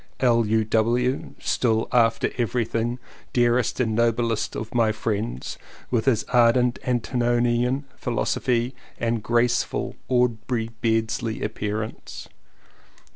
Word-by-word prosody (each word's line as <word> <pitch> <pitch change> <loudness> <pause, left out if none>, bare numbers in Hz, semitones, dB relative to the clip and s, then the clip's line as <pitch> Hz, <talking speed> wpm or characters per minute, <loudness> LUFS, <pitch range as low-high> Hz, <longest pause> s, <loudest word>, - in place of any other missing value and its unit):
L.U.W. 115 +1 +1
(still 115 -2 +1
after 115 -3 +3
everything 120 0 0 0.4
dearest 120 0 +2
and 115 -3 +1
noblest 115 0 0
of 110 +1 -5
my 115 -2 +3
friends), 110 - -3 0.3
with 120 -3 +1
his 125 -6 +2
ardent 120 0 +4
antinomian 120 +1 +1
phil 120 -2 -3
osophy 120 +1 0 0.3
and 115 -1 0
graceful 120 +2 0
Aubrey 120 -2 0
Beardsley 115 0 0
appearance. 105 +1 -4
115 Hz, 95 wpm, -24 LUFS, 110-120 Hz, 0.4 s, ardent